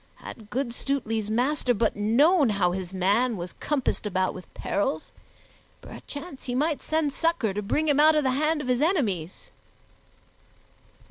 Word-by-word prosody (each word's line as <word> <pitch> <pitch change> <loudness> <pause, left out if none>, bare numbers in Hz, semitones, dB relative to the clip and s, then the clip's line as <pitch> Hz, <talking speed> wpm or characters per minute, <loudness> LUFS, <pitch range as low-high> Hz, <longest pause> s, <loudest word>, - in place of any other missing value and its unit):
Had 215 -3 -11
good 245 +1 -2
Stutely's 225 -6 -2
master 250 +2 +1
but 225 +1 +1
known 270 - +4
how 195 -4 +1
his 185 -1 -4
man 205 +6 +1
was 175 0 -6
compassed 270 -7 -1
about 185 -2 0
with 185 - -11
perils, 180 -6 -2 0.7
perchance 285 -1 -9
he 245 - -3
might 300 +3 0
send 310 -3 0
succor 330 - 0
to 210 - -2
bring 300 +10 0
him 290 -1 +3
out 310 +1 +6
of 300 - +2
the 260 - +2
hand 305 +3 +1
of 275 - -6
his 250 +1 +1
enemies. 215 - -1
245 Hz, 155 wpm, -26 LUFS, 205-295 Hz, 0.7 s, out